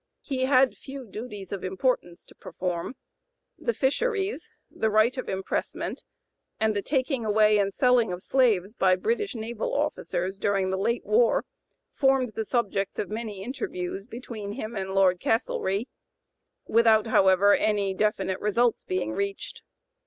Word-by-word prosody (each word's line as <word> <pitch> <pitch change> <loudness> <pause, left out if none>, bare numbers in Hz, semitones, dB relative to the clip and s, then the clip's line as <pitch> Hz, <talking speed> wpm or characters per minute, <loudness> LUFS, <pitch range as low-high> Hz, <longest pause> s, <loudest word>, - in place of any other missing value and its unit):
He 260 -2 -1
had 265 -1 +4
few 270 -1 -9
duties 210 -3 -8
of 200 -2 -4
importance 185 -2 -1
to - - -17
perform. 180 +5 -4 0.6
The 475 - 0
fisheries, 410 - -1 0.2
the 220 - 0
right 215 +3 +3
of 255 - -5
impressment, 190 0 -3
(p. - - -24 0.6
099) 220 - +2
and 215 - 0
the 205 - 0
taking 265 0 -1
away 215 0 +4
and 200 -1 +1
selling 245 -2 +3
of 180 +1 -6
slaves 215 -7 +2
by 185 -5 +3
British 425 - -1
naval 225 0 -3
officers 195 -10 -2
during 195 -2 +1
the 190 - -1
late 235 +4 0
war, 475 +3 +3 0.5
formed 270 -3 +2
the 220 - -3
subjects 200 -5 -1
of 205 - -3
many 215 -3 -5
interviews 195 -5 -4
between 230 -4 -7
him 225 -1 -6
and 190 -1 -3
Lord 185 -2 +4
Castlereagh, 210 -2 0 0.8
without, 225 -1 +4
however, 195 -2 +5
any 205 -2 +1
definite 190 -2 0
results 230 +3 +1
being 185 -13 -2
reached. 200 - -4
215 Hz, 150 wpm, -26 LUFS, 195-250 Hz, 0.8 s, however